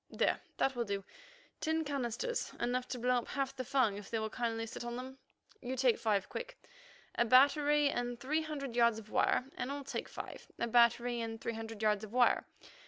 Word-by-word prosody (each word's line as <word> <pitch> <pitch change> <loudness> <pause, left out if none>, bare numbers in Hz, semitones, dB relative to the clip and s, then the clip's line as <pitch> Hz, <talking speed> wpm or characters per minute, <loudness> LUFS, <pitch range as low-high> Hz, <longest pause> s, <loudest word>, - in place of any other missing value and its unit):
There, - - +1 0.2
that 270 - +1
will 240 - 0
do. 200 -2 -3 0.6
Ten 320 0 0
canisters; 280 - -2
enough 250 +1 0
to 255 - -4
blow 250 +1 +2
up 240 - -3
half 275 0 -2
the 260 - -3
Fung 250 -6 +2
if 205 -1 -9
they 230 - -1
will 220 0 -2
kindly 225 -1 -2
sit 225 - -7
on 240 0 -4
them. 260 +2 -7 0.4
You 255 +2 -3
take 255 -2 +3
five, 205 -4 +1
Quick, - - -6 0.6
a - - +3
battery 285 +4 +5
and 245 -3 -2
three 300 +6 0
hundred 280 -6 -5
yards 235 -2 +4
of 215 -1 -10
wire, 250 - +2
and 260 - -3
I'll 285 0 -4
take - - -4
five, - - -8
a - - 0
battery, 235 0 +3
and 225 0 -4
three 230 - -3
hundred 225 -1 -6
yards 210 -1 +2
of 215 0 -8
wire. 250 -1 +4
245 Hz, 205 wpm, -34 LUFS, 225-270 Hz, 0.6 s, battery